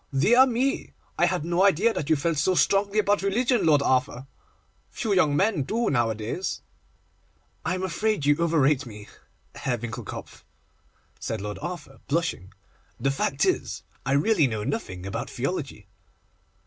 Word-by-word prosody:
'Dear 240 - +5
me! 260 +3 -1 0.3
I - - +5
had 180 -4 -1
no 175 +2 +2
idea 200 +4 +4
that 150 - -4
you 160 - +5
felt 160 +2 -1
so 185 +6 +2
strongly 200 +3 +2
about 205 -1 +3
religion, 235 +3 +1
Lord 145 -3 +4
Arthur. 130 -1 0 0.6
Few 220 -5 -2
young 155 -6 +3
men 195 -4 +2
do 225 - 0
nowadays.' 115 - -1 1.0
'I 175 +3 0
am 185 - -4
afraid 205 -2 -1
you 145 0 +5
overrate 150 -5 +2
me, 105 -2 -10 0.5
Herr 125 -3 -2
Winckelkopf,' 120 0 -7 0.8
said 110 - -3
Lord 105 -1 -5
Arthur, 155 - -7
blushing. 145 - -1 0.5
'The 135 +3 +1
fact 135 +1 0
is, - - -1 0.2
I 135 - 0
really 155 +1 +3
know 110 -3 -3
nothing 105 - -4
about 100 - -4
theology. - - -4
155 Hz, 150 wpm, -25 LUFS, 130-200 Hz, 1.0 s, Dear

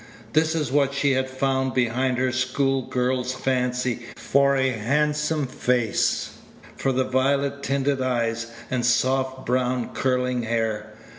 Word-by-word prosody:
This 160 +1 +2
is 150 -6 -1
what 140 -1 +2
she 140 0 +2
had 130 0 0
found 130 0 0
behind 125 +1 +1
her 130 0 +1
school 130 +2 0
girl's 125 0 0
fancy 125 -2 -1
for 140 0 +2
a 130 -1 +2
handsome 150 +6 0
face, 125 -3 0 0.4
for 135 - 0
violet 135 +2 +1
tinted 140 0 0
eyes, 115 -3 -1 0.2
and 125 -2 0
soft 130 +2 +1
brown 125 0 0
curling 125 -1 0
hair. 110 -2 -2
130 Hz, 130 wpm, -24 LUFS, 125-135 Hz, 0.4 s, This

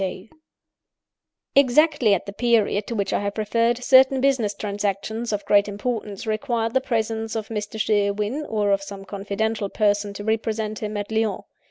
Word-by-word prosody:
"Exactly 275 -4 +4
at 180 - -5
the 200 - -7
period 215 -3 +1
to 235 - -4
which 200 -2 -1
I - - +2
have 200 +1 -3
referred, 230 +3 +1
certain 265 +1 +6
business 255 -7 +1
transactions 205 +3 -3
of 205 -1 -3
great 205 0 +4
importance 205 -1 -4
required 225 0 -1
the 260 - +3
presence 225 -2 -2
of 220 -1 -4
Mr. 210 0 -5
Sherwin, 210 +6 0
or 210 -2 0
of 195 0 +2
some 195 0 -9
confidential 205 +1 -2
person 205 -1 +1
to 205 - -6
represent 220 0 -2
him, 210 -1 -4
at 205 +1 -5
Lyons. 220 -2 0
215 Hz, 160 wpm, -23 LUFS, 205-230 Hz, -, certain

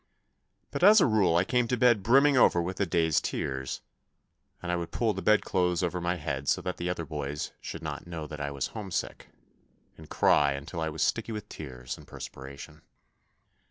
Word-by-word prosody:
But - - -4
as 210 +3 +9
a - - +5
rule 105 -8 +3
I 85 - +4
came 125 +4 +1
to 125 - 0
bed 120 -3 +4
brimming 135 +7 +5
over 105 -8 +5
with 90 +2 -3
the 100 - 0
day's 80 -3 +2
tears, 65 0 -3 0.8
and 90 - -4
I - - +1
would 85 -1 -3
pull 115 -3 0
the 95 - -5
bed 105 +1 +4
clothes 90 -1 0
over 90 0 -1
my 85 +1 0
head 70 -5 -4
so - - +3
that 90 - -3
the 85 +1 -3
other 85 -2 -3
boys 75 -2 -4
should 85 - -7
not 75 +1 -5
know 85 -3 -5
that 75 -1 -7
I 70 - -2
was 70 -2 -3
homesick, 100 -5 -4 0.7
and 80 - -13
cry 70 -1 +3
until 75 +5 -6
I 80 - -1
was 80 0 -2
sticky 115 +7 0
with 105 -1 -7
tears 65 -5 -7
and - - -15
perspiration. 70 +3 -9
85 Hz, 200 wpm, -28 LUFS, 75-100 Hz, 0.8 s, as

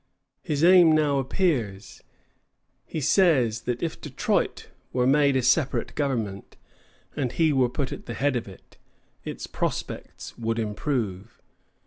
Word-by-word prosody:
His 150 0 -2
aim 175 -2 +7
now 150 -3 +2
appears. 120 - -2 0.9
He 160 - -4
says 130 - +3
that 120 +4 -2
if 165 - -3
Detroit - - -1 0.2
were 125 -1 +1
made 140 +1 +4
a 130 - +1
separate 130 +2 +1
government, 115 -9 -3 0.6
and 130 -4 -1
he 160 -2 +2
were 130 -3 +3
put 130 +2 -3
at - - -8
the 115 - -5
head 140 -1 +1
of 120 - -3
it, 95 - -15 0.5
its - - -6
prospects - - -5
would 115 0 -1
improve. 110 - -3
130 Hz, 135 wpm, -25 LUFS, 115-150 Hz, 0.9 s, aim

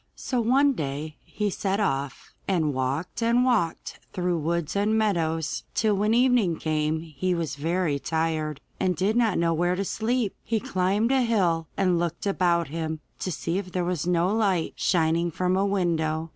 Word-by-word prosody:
So 250 -3 -1
one 270 +5 +4
day 150 - -4
he 210 -1 -2
set 195 +2 -1
off, 140 -8 -2
and 160 -6 +1
walked 135 - -2
and 235 +2 +3
walked 215 -10 0
through 180 -2 0
woods 170 +1 -2
and 210 +2 +2
meadows 165 -7 0
till 215 -2 +2
when 210 +3 +2
evening 240 -9 +3
came 155 0 -1
he 165 +3 -2
was 165 -3 -2
very 160 0 0
tired, 160 -1 -1 0.2
and 185 -1 +1
did 195 +6 +1
not 230 -5 +2
know 170 0 +2
where 175 +2 +1
to 195 +2 -2
sleep. 225 +1 -1
He 225 -1 0
climbed 195 +5 0
a 265 -1 +3
hill 180 -9 +1
and 180 -3 +2
looked 170 +1 -3
about 175 -5 +1
him 160 0 -3 0.2
to 185 - -3
see 170 +3 -2
if 185 -2 -7
there 180 -1 0
was 175 -2 -2
no 180 +2 +2
light 195 -7 +1
shining 170 0 +1
from 180 +3 0
a 195 +1 +2
window. 165 -4 0
175 Hz, 175 wpm, -26 LUFS, 160-205 Hz, 0.2 s, one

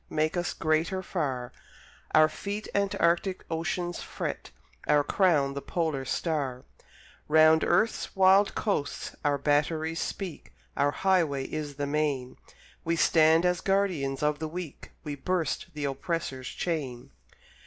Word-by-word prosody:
Make 155 +2 0
us 175 0 -2
greater 165 +4 0
far; 135 -10 -3 0.6
Our 155 0 +7
feet 200 +7 -5
antarctic 190 -2 +1
oceans 175 +1 -2
fret, - - -5 0.4
Our 145 -1 +4
crown 150 -7 +2
the 140 - -4
polar 155 -6 -2
star: 135 -4 -2 0.6
Round 155 +1 +6
Earth's 225 -1 +1
wild 195 +1 +5
coasts 195 -9 -2
our 145 -1 +2
batteries 155 +3 0
speak, 185 -6 -5 0.2
Our 145 - +2
highway 165 -5 +1
is 150 -2 -5
the 145 0 -2
main, 140 -3 -1 0.5
We 165 0 0
stand 160 +1 +4
as 180 -1 +1
guardian 185 -9 0
of 150 0 +1
the 160 - -3
weak, 165 -2 -7
We 150 - -4
burst 165 +6 -2
the 150 -1 -3
oppressor's 135 -2 -3
chain. 140 -8 -4
155 Hz, 130 wpm, -28 LUFS, 145-180 Hz, 0.6 s, Our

